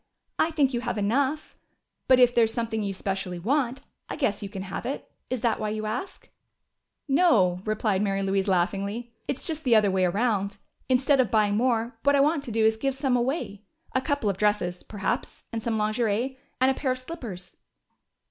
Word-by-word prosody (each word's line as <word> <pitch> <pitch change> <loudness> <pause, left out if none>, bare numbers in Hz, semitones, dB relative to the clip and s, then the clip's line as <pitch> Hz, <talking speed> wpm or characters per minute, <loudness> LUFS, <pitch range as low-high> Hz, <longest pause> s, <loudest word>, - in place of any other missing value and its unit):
"I 320 - +3
think 290 -5 +1
you 240 - 0
have 240 -2 -3
enough. 270 +9 0 0.5
But 255 -1 +6
if 245 -1 +6
there 235 -2 +5
is 220 - -3
something 225 -1 -2
you 200 -1 -2
specially 190 -1 -3
want, 255 - 0 0.3
I - - -3
guess 265 -9 0
you 200 - -5
can 195 -2 -6
have 195 0 -5
it. 265 +4 -4 0.2
Is 255 -3 -2
that 230 -2 +1
why 215 - -1
you 215 0 -3
ask?" 245 - -5 0.8
"No," 240 - +4
replied 215 -2 0
Mary 195 -1 0
Louise 195 0 0
laughingly. 200 +5 -1
"It's 275 - -3
just 315 -2 -3
the 245 -5 +4
other 210 -2 +4
way 185 -1 +2
around. 200 +1 0 0.3
Instead 265 +2 +3
of 255 - +3
buying 210 -3 +2
more, 230 0 0
what 285 0 +4
I - - +4
want 295 +2 +3
to 240 - -5
do 220 0 +2
is 220 0 +3
to - - -24
give 270 -1 0
some 270 -2 +1
away. 240 -5 -1 0.3
A 260 - +2
couple 285 -6 -1
of 195 -2 0
dresses, 205 -4 0
perhaps, 205 -2 -3
and 225 - -2
some 225 0 -1
lingerie. 220 +4 0 0.2
And 260 +1 +4
a - - +1
pair 265 0 -2
of - - -7
slippers." 240 - -8
225 Hz, 205 wpm, -26 LUFS, 200-260 Hz, 0.8 s, But